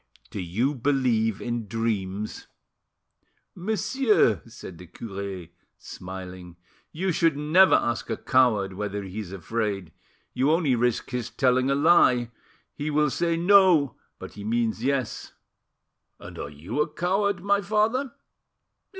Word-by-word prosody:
Do - - -5
you 110 - -1
believe 120 -5 0
in 120 -2 -3
dreams?" 105 -2 -3 1.1
"Monsieur," 210 - +1
said 85 - -11
the 90 - -11
cure, 100 -1 -7 0.3
smiling, 90 -1 -9 0.4
"you 185 +4 -1
should 165 -3 +2
never 160 +6 +5
ask 120 0 -1
a 115 - -2
coward 110 -7 +2
whether 105 +1 -4
he 95 +2 -7
is 100 -4 -7
afraid, 100 -2 -3 0.4
you 130 +3 +1
only 160 -4 +2
risk 120 +1 0
his 125 -3 -3
telling 130 0 +2
a 140 - +2
lie. 140 -6 +4 0.4
He 150 +1 -4
will 150 -1 +2
say 170 +2 0
'No,' 175 - +5 0.2
but - - -10
he 105 - -9
means 115 +1 -1
'Yes.'" 135 -3 -2 0.9
"And - - -10
are 70 - -5
you 75 - -4
a 150 - +1
coward, 190 +2 0
my 200 0 +2
father?" 215 +6 0
125 Hz, 135 wpm, -25 LUFS, 100-165 Hz, 1.1 s, never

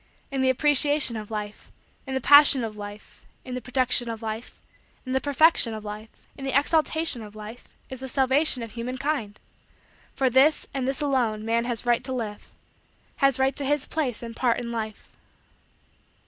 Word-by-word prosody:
In 270 -1 -1
the 260 - +3
appreciation 290 -1 +3
of 215 -1 -6
Life, 210 -1 -7 0.4
in 265 - -3
the 265 - -1
passion 285 -2 +7
of 220 -2 -5
Life, 205 0 -10 0.2
in 255 - -7
the 250 - -4
production 250 0 +1
of 225 0 -6
Life, 220 +1 -6 0.5
in 255 - -5
the 265 - +1
perfection 285 -5 +3
of 215 0 -8
Life, 210 +1 -9
in 275 - -10
the 270 0 +1
exaltation 315 -2 +1
of 210 -1 -11
Life, 215 +3 -10 0.2
is 260 - -8
the 265 - -6
salvation 265 0 +2
of 230 - -8
human 245 +2 -5
kind. 270 -7 -3 0.8
For 265 - +1
this, 265 +5 +4
and 265 -2 -2
this 270 0 -2
alone, 240 -7 0
man 230 +1 0
has 240 -1 -4
right 240 0 +2
to 260 +1 -2
live 220 -5 -6 0.7
has 275 -1 +3
right 265 0 +1
to 285 - -2
his 290 +1 0
place 260 -8 -3
and 230 -1 -7
part 240 -2 +1
in 235 -1 -5
Life. 220 -2 -6
250 Hz, 185 wpm, -25 LUFS, 225-275 Hz, 0.8 s, passion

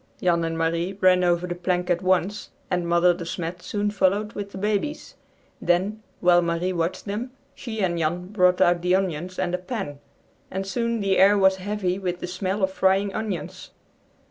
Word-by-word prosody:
Jan 170 -2 +2
and 165 0 -2
Marie 165 +3 0
ran 185 -1 +5
over 175 0 +2
the 180 - -3
plank 180 0 -1
at 175 - +1
once, 185 +2 0 0.2
and 180 -1 0
Mother 170 +1 +4
De 175 0 -6
Smet 170 +1 -5
soon 205 +1 -2
followed 205 +2 +1
with 200 -1 -6
the - - -8
babies. 210 +9 -2 0.5
Then, 190 +5 +1 0.2
while 175 -1 +5
Marie 170 +2 -1
watched 170 0 -2
them, 215 +5 -3 0.2
she 220 -4 -5
and 170 -2 0
Jan 175 +3 -1
brought 180 -3 +3
out 175 0 +4
the 180 +1 +3
onions 185 -1 -2
and 180 -1 -1
a 180 - 0
pan, 180 - -5 0.5
and 190 +1 -3
soon 235 +2 -1
the 195 -1 +2
air 200 +2 +6
was 190 -1 +4
heavy 190 -1 -2
with 180 -2 -3
the - - -4
smell 185 +2 -2
of 190 - +2
frying 190 +1 +2
onions. 210 -5 -5
185 Hz, 190 wpm, -24 LUFS, 175-200 Hz, 0.5 s, air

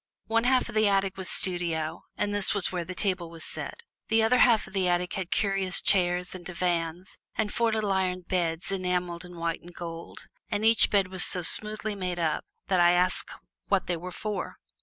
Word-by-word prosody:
One 230 +1 +1
half 255 0 +3
of 240 - -8
the 215 -1 +3
attic 195 -1 +1
was 190 -1 -5
studio, 170 -3 +1
and 205 0 -1
this 205 0 +3
was 200 - +1
where 180 -2 -2
the 185 +2 -7
table 185 -3 -1
was 165 -1 -8
set. 470 - -5 0.2
The 225 0 +3
other 250 +3 +4
half 235 -4 +5
of 190 - -14
the 190 -2 +1
attic 175 0 0
had 185 -3 -3
curious 195 -2 0
chairs 180 -1 +2
and 185 -1 -8
divans 175 0 -2 0.2
and 210 -1 -1
four 230 -1 +2
little 215 -2 0
iron 185 -1 0
beds 175 0 -2
enameled 180 -2 -2
in 180 -1 -11
white 165 -1 -2
and 175 - -12
gold, 165 -1 -8 0.2
and 210 0 -1
each 225 0 +6
bed 195 -3 +2
was 185 -1 +1
so 180 - -1
smoothly 215 +4 0
made 180 -3 -3
up 160 -3 0 0.2
that 185 -2 +1
I 175 0 +6
asked 180 +1 +1 0.4
what 195 -2 +2
they 175 - -1
were 180 +2 -7
for. 210 +2 -4
185 Hz, 205 wpm, -27 LUFS, 175-205 Hz, 0.4 s, each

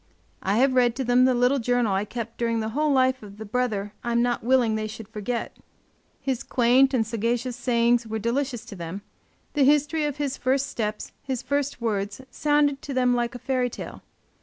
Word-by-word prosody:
I 195 +3 +1
have 260 +2 +4
read 245 -2 +3
to 265 - -2
them 245 +1 +4
the 255 -1 +3
little 250 +3 +3
journal 245 -3 +1
I 195 +2 0
kept 230 +1 -6
during 230 -1 0
the 220 0 -2
whole 300 +6 +1
life 260 -1 +3
of 205 -1 -11
the 220 - -7
brother 210 -3 -1
I 235 -1 -1
am 235 0 +3
not 240 -2 0
willing 245 -2 +3
they 215 0 -2
should 220 0 -9
forget. 225 +2 -4 0.6
His 265 -3 -2
quaint 255 +2 +4
and 225 -3 +2
sagacious 235 +3 -1
sayings 240 -1 +2
were 220 0 -3
delicious 240 +2 -2
to 200 - -9
them; 175 +3 -6 0.5
the 290 - +3
history 295 +2 +3
of 295 -1 -3
his 280 -2 -2
first 265 +1 +1
steps, 215 -5 -4
his 260 -3 -4
first 285 -2 -1
words 205 -2 -2
sounded 290 -1 +2
to 275 - -6
them 250 -1 +3
like 240 0 -1
a - - -6
fairy 255 -2 +1
tale. - - -8
245 Hz, 205 wpm, -25 LUFS, 225-265 Hz, 0.6 s, have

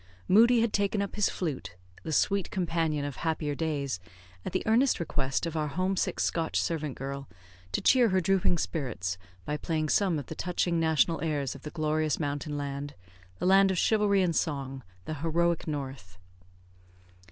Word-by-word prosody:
Moodie 230 +4 +6
had 230 -2 +1
taken 200 +1 +1
up 200 0 -2
his 210 - +2
flute, 145 - -4 0.3
the 160 - -5
sweet 195 +5 +1
companion 165 -5 0
of 145 -2 -5
happier 160 -2 -1
days, 140 - -2 0.4
at - - -4
the - - -1
earnest 240 +5 +3
request 140 -3 -1
of 165 -1 -4
our 155 -1 0
homesick 185 +5 -1
Scotch 165 -1 0
servant 155 -5 -2
girl, 135 0 -5 0.4
to - - -1
cheer 245 -3 +5
her 190 0 +3
drooping 185 -1 +2
spirits 105 - -3 0.3
by 150 - -2
playing 155 -1 -1
some 190 -3 +2
of 145 - -4
the - - -6
touching 175 0 0
national 160 +1 +2
airs 145 -4 -1
of - - -11
the 150 - -6
glorious 155 -1 0
mountain 145 0 -2
land, 140 0 -4 0.4
the - - -3
land 195 +1 +6
of 190 - 0
chivalry 205 -1 +3
and 170 -3 0
song, 135 -4 -2 0.2
the - - -3
heroic 170 +1 +1
North. 135 - -5
160 Hz, 170 wpm, -29 LUFS, 145-185 Hz, 0.4 s, Moodie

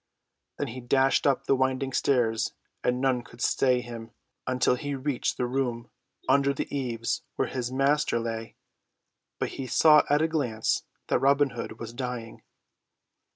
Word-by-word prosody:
Then 145 - -2
he 130 +3 -7
dashed 135 +3 +3
up 140 - +1
the 135 - +3
winding 130 0 0
stairs 120 -5 +1 0.3
and 125 0 +1
none 130 -2 +1
could 120 0 -16
stay 125 0 +2
him 115 -1 -8 0.4
until 130 0 +2
he 140 +3 -3
reached 135 -1 -1
the 125 - 0
room 120 -2 -2 0.4
under 140 0 +3
the - - -4
eaves 120 -4 -2
where - - 0
his 125 -1 -3
master 140 +1 +2
lay. 115 -1 -5 0.8
But - - -2
he 135 - -6
saw 150 +3 +6
at 145 +2 +3
a - - +3
glance 125 -9 -1 0.2
that - - +3
Robin 140 0 +3
Hood 120 - -6
was 115 0 -7
dying. 125 -3 -5
130 Hz, 155 wpm, -27 LUFS, 120-140 Hz, 0.8 s, saw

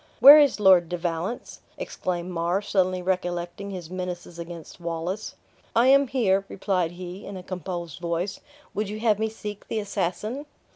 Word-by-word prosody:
"Where 280 +5 +11
is 285 -6 +4
Lord 185 -4 +6
de 175 - -2
Valence?" 175 +6 -3 0.2
exclaimed 180 0 -3
Mar, 175 +2 0
suddenly 185 -2 +1
recollecting 180 +1 -2
his 180 -4 -7
menaces 180 -2 -5
against 170 0 -8
Wallace. 170 +5 -4 0.4
"I 240 +3 +5
am 275 +1 +6
here," 200 -7 +2
replied 185 -4 -1
he, 180 +2 -8
in 200 - -7
a 180 - -8
composed 175 -3 -5
voice; 170 +3 -2 0.3
"would 210 -1 -2
you 215 +1 -5
have 215 -3 +3
me 220 0 0
seek 210 -2 -8
the - - -2
assassin?" 210 - -3
185 Hz, 160 wpm, -26 LUFS, 175-210 Hz, 0.4 s, Where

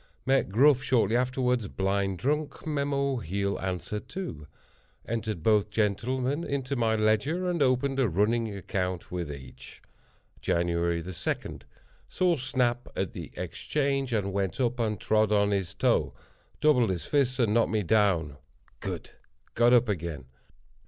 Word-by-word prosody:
Met 135 -4 +2
Gruff 135 +6 +5
shortly 120 -3 +2
afterward, 125 -3 0
blind 95 0 0
drunk. 145 - -2
Mem—he'll 140 - -1
answer, 95 +2 -3
too. 95 - -7 0.6
Entered 110 -6 -3
both 105 -1 +3
gentlemen 125 - 0
in 140 -4 -2
my 115 -3 +2
Ledger, 110 - +1
and 175 -3 -1
opened 135 +1 +2
a 125 -5 +3
running 110 +5 +1
account 90 -2 -3
with 85 -4 -3
each. 65 -2 -11 0.6
"Jan. 85 0 +1
2.—Saw 85 - -2
Snap 125 -2 0
at 95 -2 -2
the - - -7
Exchange, 135 -3 -1
and 100 -4 -1
went 95 -3 -1
up 125 -1 0
and 110 -2 0
trod 110 -1 +2
on 100 -1 +3
his 95 -1 -1
toe. - - +1 0.5
Doubled 125 -8 +4
his 85 -4 -2
fist 135 -3 +1
and 115 -5 +2
knocked 115 0 +3
me 110 -2 0
down. 85 -7 +2 0.4
Good!—got 120 +1 -2
up 125 0 +5
again. 85 - -3
110 Hz, 130 wpm, -28 LUFS, 95-130 Hz, 0.6 s, Gruff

